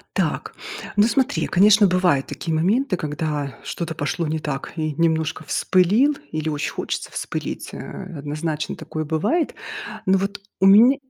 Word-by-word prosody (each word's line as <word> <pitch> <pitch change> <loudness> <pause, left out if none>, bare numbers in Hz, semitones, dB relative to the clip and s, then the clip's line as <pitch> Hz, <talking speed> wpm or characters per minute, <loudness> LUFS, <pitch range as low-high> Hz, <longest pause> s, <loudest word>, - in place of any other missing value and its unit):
Так, - - -1 0.4
ну 205 - +6
смотри, 265 +3 +1
конечно, 205 +2 +6
бывают 180 -7 +2
такие 165 - -4
моменты, 195 - +2
когда 150 -3 -3
что-то 170 -2 -4
пошло 155 +4 -2
не 155 +1 -1
так 140 -3 -4
и 155 -1 -1
немножко 160 0 0
вспылил 205 - +3 0.2
или 155 0 -2
очень 150 -1 -2
хочется - - -4
вспылить, - - -4
э, - - -7 0.4
однозначно 150 +1 -3
такое 155 0 -5
бывает. 200 - 0 0.5
Но 190 0 +4
вот 200 +1 -3 0.2
у 190 - +5
меня 225 +8 +8
165 Hz, 145 wpm, -22 LUFS, 155-200 Hz, 0.5 s, меня